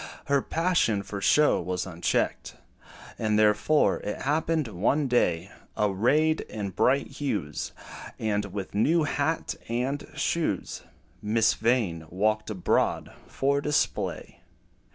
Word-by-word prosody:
Her 140 -2 +2
passion 165 - +1
for 100 -1 -6
show 150 +8 +4
was 90 +1 -3
unchecked; 85 -2 -1 0.6
And 110 -1 +1
therefore, 105 +8 +3
it 105 - -5
happened 155 +1 0
one 115 +9 0
day, 95 -7 +1 0.3
Arrayed 125 +11 +2
in 100 -3 -4
bright 135 +8 +2
hues, 105 - -3 0.5
And 105 -1 -1
with 100 -1 -6
new 155 +11 +3
hat 145 +2 -1 0.2
and 125 +5 -2
shoes, 155 - -1 0.4
Miss 110 +1 +2
Vain 105 -9 0
walked 110 +5 0
abroad 95 -4 0
for 140 +1 0
display. 150 0 -1
110 Hz, 110 wpm, -27 LUFS, 100-145 Hz, 0.6 s, show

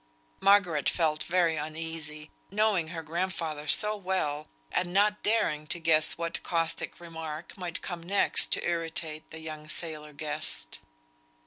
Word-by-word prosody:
Margaret 180 -7 +4
felt 155 -3 +1
very 170 -2 +2
uneasy, 155 0 -5 0.2
knowing 205 -4 +2
her 165 0 -5
grandfather 160 -2 -2
so 210 +7 +5
well, 180 -7 -1 0.2
and 175 -1 0
not 205 +2 +3
daring 155 -9 +1
to 175 - -3
guess 155 -2 +4
what 170 0 -2
caustic 165 -2 -1
remark 160 -1 -7
might 180 -3 -5
come 175 -2 -5
next 195 +4 +3
to - - 0
irritate 165 -2 -3
the 160 - -9
young 155 -1 -7
sailor 155 -2 -3
guest. 150 - -2
165 Hz, 135 wpm, -29 LUFS, 155-180 Hz, 0.2 s, so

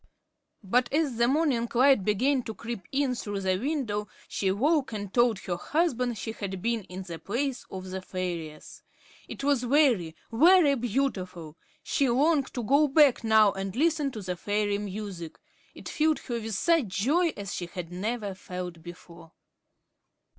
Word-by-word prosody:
But 240 +5 +1
as 290 -5 0
the 235 0 +3
morning 270 -4 +1
light 260 -3 +5
began 255 +7 +2
to 220 - -6
creep 230 -5 -7
in 275 -1 +1
through 205 -4 -4
the 190 -1 +1
window, 235 -6 -2 0.2
she 195 - -2
awoke 265 - +1
and 205 -2 -5
told 240 -3 +3
her 175 -2 -3
husband 250 - 0
she 215 +3 -4
had 195 -4 -5
been 230 0 -1
in 185 +1 -7
the 170 -3 -8
palace 250 - -3
of 185 0 -7
the 190 0 -4
fairies. 175 -5 -6 0.5
It - - -8
was 280 -3 +2
very, 245 - +2 0.2
very 320 +4 +6
beautiful. 200 - -2 0.3
She 275 -4 +1
longed 280 +3 +2
to 245 - -2
go 280 +6 +4
back 280 -3 +4
now 220 -2 +5
and 195 0 -5
listen 305 0 +2
to 215 - -6
the 180 -1 -3
fairy 205 +2 -1
music. 200 -5 -6 0.4
It - - -10
filled 310 -1 +1
her 240 -3 -4
with 220 -2 -4
such 330 - +2
joy 265 - +1
as 200 -1 -5
she 175 - -4
had 175 -1 -7
never 205 +2 -3
felt 180 -2 -7
before. 170 -1 -13
225 Hz, 165 wpm, -27 LUFS, 190-275 Hz, 0.5 s, very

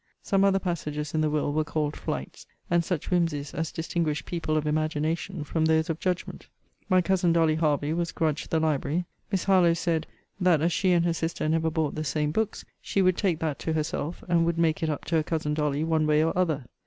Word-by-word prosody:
Some 195 -1 +2
other 195 -1 +4
passages 150 -5 -3
in 155 - +1
the 155 - +2
will 150 -1 0
were 155 +1 +1
called 150 -1 -2
flights, - - -5 0.2
and 170 -1 +3
such 170 -3 -3
whimsies 165 -5 0
as 160 0 -2
distinguish 165 -2 -2
people 160 -3 -1
of 155 - -1
imagination 155 +3 -1
from 160 +2 0
those 160 0 +2
of 160 - -5
judgment. 180 -2 -3 0.4
My 185 -1 +4
cousin 180 -2 +2
Dolly 165 -2 +3
Hervey 150 -1 +1
was 170 0 -1
grudged 155 -3 -1
the 160 - +2
library. 155 +2 0 0.3
Miss 190 -3 0
Harlowe 180 -4 +4
said, 165 -2 -1 0.3
That 180 -4 +4
as 165 +3 +1
she 190 -2 +2
and 170 -1 +3
her 170 - +2
sister 165 -1 -2
never 160 +1 +1
bought 160 -2 -1
the 155 - -3
same 150 0 0
books, 220 +5 -2 0.2
she 195 - 0
would 185 -1 +4
take 180 -5 +1
that 155 -3 -2
to 160 - -2
herself, 155 +1 -3
and 170 -1 +3
would 170 0 0
make 165 -2 +1
it 160 - 0
up 150 - -3
to 165 - +1
her - - +3
cousin 155 -2 -1
Dolly 150 -1 0
one 160 -1 +1
way 150 0 +4
or 165 - 0
other. 160 -7 0
160 Hz, 220 wpm, -27 LUFS, 155-170 Hz, 0.4 s, other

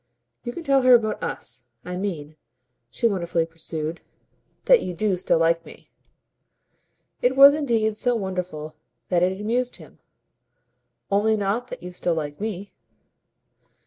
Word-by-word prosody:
"You 240 - -4
can 335 - -8
tell 275 -3 +3
her 255 -1 +7
about 215 -2 0
US. 125 - -6 0.2
I 180 - -5
mean," 165 -6 -4 0.5
she 120 - -3
wonderfully 170 -5 0
pursued, 165 0 -6 0.6
"that - - +6
you 180 - -5
do 205 +1 +1
still 180 - +1
like 165 0 +2
me." - - -15 1.3
It 250 +1 +2
was 275 +1 +9
indeed 230 -8 0
so 245 +2 +1
wonderful 180 -7 -4 0.4
that 175 -2 +2
it 185 +2 +1
amused 240 +4 -1
him. - - -14 1.1
"Only 215 +2 +3
not 210 +5 -1
that - - -9
you 180 - -7
still 175 -1 -1
like 150 +1 -5
me." 205 -2 -5
195 Hz, 145 wpm, -24 LUFS, 170-235 Hz, 1.3 s, was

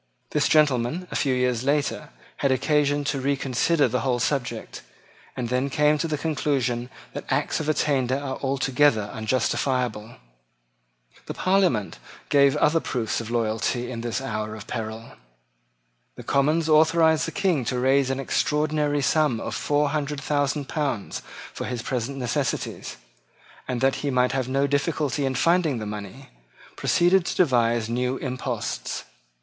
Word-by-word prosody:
This - - +2
gentleman, 150 +3 +2
a - - -5
few 135 -3 +1
years 125 -1 0
later, 145 +1 0 0.3
had 140 - +1
occasion 145 +2 +2
to 140 -1 -2
reconsider 140 +2 +1
the 125 +1 -1
whole 125 +1 0
subject, 120 -3 -2 0.6
and 120 -2 -2
then 130 +3 0
came 150 +2 +2
to 165 - 0
the 155 -2 -1
conclusion 135 -5 -1 0.2
that - - -7
acts - - 0
of 155 -1 -2
attainder 135 -4 +1
are 140 -2 -4
altogether 135 -5 +1
unjustifiable. 120 0 -1 1.1
The - - -5
Parliament 185 - +1 0.3
gave 140 -1 +5
other 150 +2 +3
proofs 120 -7 -2
of 115 - -7
loyalty 120 +1 -1
in 115 -2 -5
this 120 +1 -2
hour 110 -4 -4
of 110 0 -9
peril. 115 -1 -5 1.0
The - - -9
Commons 155 +4 +2
authorised 160 0 +4
the - - -4
King 185 -9 +1
to 125 - -1
raise 130 +1 +3
an 135 0 -1
extraordinary 150 +1 0
sum 150 -3 +2
of - - -5
four 145 0 +1
hundred 150 -1 -2
thousand 145 0 -1
pounds 140 -10 -2 0.3
for - - -5
his 120 -2 -4
present 130 +2 -3
necessities, 125 -3 -3 0.7
and 125 -2 -2
that 135 0 +2
he 145 - -1
might 125 -1 +2
have 130 -2 -2
no 135 +1 +2
difficulty 145 -1 0
in 130 - -2
finding 165 -1 +2
the 110 - -4
money, 105 +5 -7 0.5
proceeded 175 +2 +3
to - - -2
devise 120 -8 +2
new 125 +3 -1
imposts. 125 -3 -4
135 Hz, 150 wpm, -24 LUFS, 120-150 Hz, 1.1 s, gave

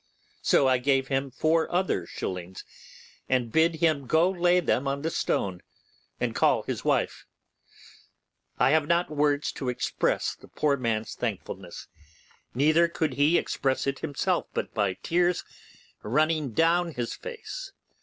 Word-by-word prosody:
So 135 - +4
I 130 -1 +3
gave 135 0 +1
him 135 0 0
four 160 +5 +1
other 175 - 0
shillings, 90 0 -6 0.6
and 125 -3 +1
bid 160 +3 +3
him 155 -5 +1
go 165 +6 +3
lay 180 -1 +3
them 140 -5 0
on 140 +1 -2
the 160 - -1
stone 95 - -1 0.6
and - - -1
call - - +2
his - - -4
wife. - - 0 1.3
I - - +4
have 155 -1 +3
not 170 0 +1
words 145 -1 +1
to 130 - -4
express 125 - -1
the - - -17
poor 145 -2 +1
man's 115 -4 -2
thankfulness, - - -5 0.7
neither 155 +6 +4
could 160 -4 -2
he 145 +6 +3
express 135 -1 -1
it 140 0 -2
himself 145 -3 -1
but - - -3
by 100 -3 +1
tears 175 - +1 0.6
running 150 +2 +1
down 165 +4 +2
his 120 -1 -3
face. 475 +1 -7
145 Hz, 145 wpm, -27 LUFS, 130-165 Hz, 1.3 s, So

